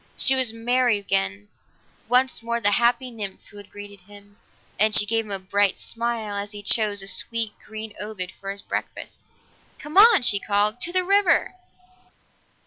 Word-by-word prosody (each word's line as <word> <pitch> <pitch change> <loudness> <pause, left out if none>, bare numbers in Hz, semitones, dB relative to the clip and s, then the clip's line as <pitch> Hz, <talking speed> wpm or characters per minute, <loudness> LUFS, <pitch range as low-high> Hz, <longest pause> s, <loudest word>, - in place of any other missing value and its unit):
She 265 - +2
was 260 -3 +2
merry 240 0 +1
again, 100 - -2 0.6
once 250 0 +2
more 235 +1 -2
the 205 -2 +2
happy 240 +3 +1
nymph 205 -4 -8
who 205 - -14
had 205 -1 -12
greeted 205 -1 -11
him, 205 +2 -18 0.4
and 215 +1 +2
she - - +6
gave 225 +1 -1
him - - -13
a 195 - -2
bright 200 +1 0
smile 230 -2 -4
as 200 +1 -5
he 205 0 -8
chose 205 -2 +2
a - - -6
sweet 225 +3 -1
green 220 0 -8
ovoid 200 -4 -5
for 195 - -10
his 200 0 -6
breakfast. - - -6 0.5
"Come 300 +4 -7
on!" 425 - +7
she 210 -4 +2
called. 210 +3 0
"To 345 - +1
the 370 0 +2
river!" 395 -1 +2
215 Hz, 175 wpm, -23 LUFS, 200-240 Hz, 0.6 s, on